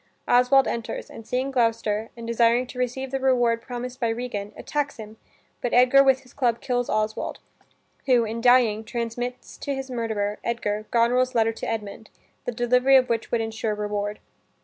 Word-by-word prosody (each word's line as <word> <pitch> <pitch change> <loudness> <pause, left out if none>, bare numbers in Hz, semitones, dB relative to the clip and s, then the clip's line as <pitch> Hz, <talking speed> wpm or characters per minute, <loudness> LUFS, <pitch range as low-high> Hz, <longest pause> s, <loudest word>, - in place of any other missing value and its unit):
Oswald 250 +2 +5
enters, 235 -1 -4
and 225 - -11
seeing 260 +2 -1
Gloucester, 230 -3 0
and 230 - -7
desiring 235 +1 +3
to 250 0 -9
receive 250 +1 -2
the 270 - -1
reward 245 -3 +2
promised 250 +1 -6
by 235 - +1
Regan, 225 -3 -4
attacks 290 -1 -3
him, 220 -1 -10 0.4
but 245 - -1
Edgar 255 +2 +6
with 265 -1 +3
his 255 -2 -20
club 240 -4 +1
kills 245 -1 -1
Oswald, 215 0 -1 0.7
who, 245 -3 +5
in 225 +1 -4
dying, 240 -3 +4
transmits 240 +2 -5
to 280 -1 -3
his 270 -1 -6
murderer, 220 -4 -2
Edgar, 215 -2 -2
Goneril's 250 +2 +2
letter 225 -1 +3
to - - -5
Edmund, 220 -1 -5 0.4
the - - -1
delivery 250 +3 +3
of 255 -1 +5
which 230 -1 -1
would 235 - +1
insure 220 -1 -2
reward. 210 0 -3
235 Hz, 170 wpm, -24 LUFS, 225-250 Hz, 0.7 s, Edgar